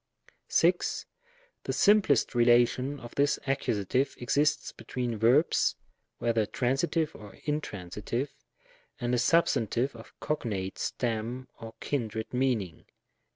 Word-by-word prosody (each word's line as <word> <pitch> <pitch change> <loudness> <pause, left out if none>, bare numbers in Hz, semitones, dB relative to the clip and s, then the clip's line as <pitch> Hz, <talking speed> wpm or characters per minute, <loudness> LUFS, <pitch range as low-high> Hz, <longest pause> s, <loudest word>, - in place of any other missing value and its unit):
6. - - +2 0.6
The - - -1
simplest 200 - +4
relation 120 +3 +3
of 120 0 -10
this 145 +1 +2
Accus. 135 -1 0
exists 145 +4 +1
be - - -14
tween 125 -2 -3
verbs, 120 +9 +3 0.4
whether 115 -2 +1
transitive 150 +5 0
or 105 -2 -12
intransitive, 120 - -3 0.7
and 120 0 -1
a 125 - +3
substantive 130 -5 +2
of 115 0 -14
cognate 100 -10 -3
stem 120 +2 -3
or 115 0 -9
kindred 110 -5 -3
meaning. 120 -10 -1
120 Hz, 110 wpm, -29 LUFS, 115-140 Hz, 0.7 s, simplest